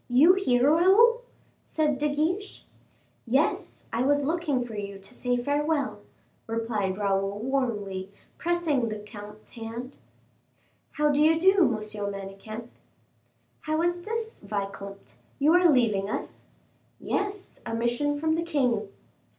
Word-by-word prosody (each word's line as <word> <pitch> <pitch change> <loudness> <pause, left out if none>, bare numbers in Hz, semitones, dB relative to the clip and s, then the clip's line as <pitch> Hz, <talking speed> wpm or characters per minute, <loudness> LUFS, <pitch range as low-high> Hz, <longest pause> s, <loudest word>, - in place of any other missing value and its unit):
"You 275 +9 +6
here, 265 -8 +3
Raoul?" 410 +9 +5 0.4
said 300 -4 0
De 300 0 +1
Guiche. 345 +8 -2 0.6
"Yes: 265 +6 0
I 230 - 0
was 285 +2 +3
looking 295 -5 0
for 235 - -9
you 200 -1 -5
to 195 +5 -8
say 245 0 -1
farewell," 285 +3 0 0.5
replied 225 -4 -1
Raoul, 195 -1 0
warmly, 210 -6 -2 0.3
pressing 325 -8 +1
the 215 - -4
comte's 210 0 -11
hand. 235 +3 -7 0.9
"How 300 0 +2
do 290 +1 +2
you 320 +1 +5
do, 380 0 +5
Monsieur 215 -3 -2
Manicamp?" 200 +4 -8 0.9
"How 310 +1 -1
is 350 0 0
this, 450 +3 -4
vicomte, 200 -1 -6 0.2
you 295 +3 +4
are 355 -1 +6
leaving 215 -8 +2
us?" - - -5 0.5
"Yes, 405 -1 -3
a 230 -1 -3
mission 240 +6 0
from 315 +2 +1
the 325 - 0
king." 250 -11 0
255 Hz, 130 wpm, -27 LUFS, 215-320 Hz, 0.9 s, You